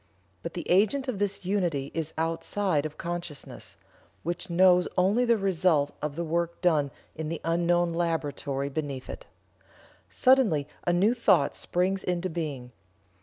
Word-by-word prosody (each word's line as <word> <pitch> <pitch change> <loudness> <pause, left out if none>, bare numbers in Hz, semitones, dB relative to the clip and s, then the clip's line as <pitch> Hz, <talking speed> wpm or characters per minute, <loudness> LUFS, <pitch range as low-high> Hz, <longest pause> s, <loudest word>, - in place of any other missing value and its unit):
But - - -6
the 175 - -5
agent 215 +9 +3
of 235 -6 -3
this 200 -2 -2
unity 175 -8 -1
is 160 -1 -2
outside 165 0 0
of 155 - -15
consciousness, 170 -4 -6 0.5
which 175 +2 -4
knows 180 0 +5
only 200 +7 +3
the 235 -1 +3
result 175 -7 +1
of 150 -1 -3
the 170 - -2
work 170 +1 -1
done 155 -6 +2 0.3
in 160 -1 -4
the 165 - -3
unknown 175 +1 +2
laboratory 145 -4 -2
beneath 140 -3 -4
it. - - -10 0.8
Suddenly 230 - +3 0.2
a - - +4
new 195 +7 +3
thought 190 - +3
springs 185 +2 -1
into 180 0 -1
being. 145 -7 -4
170 Hz, 145 wpm, -27 LUFS, 155-190 Hz, 0.8 s, knows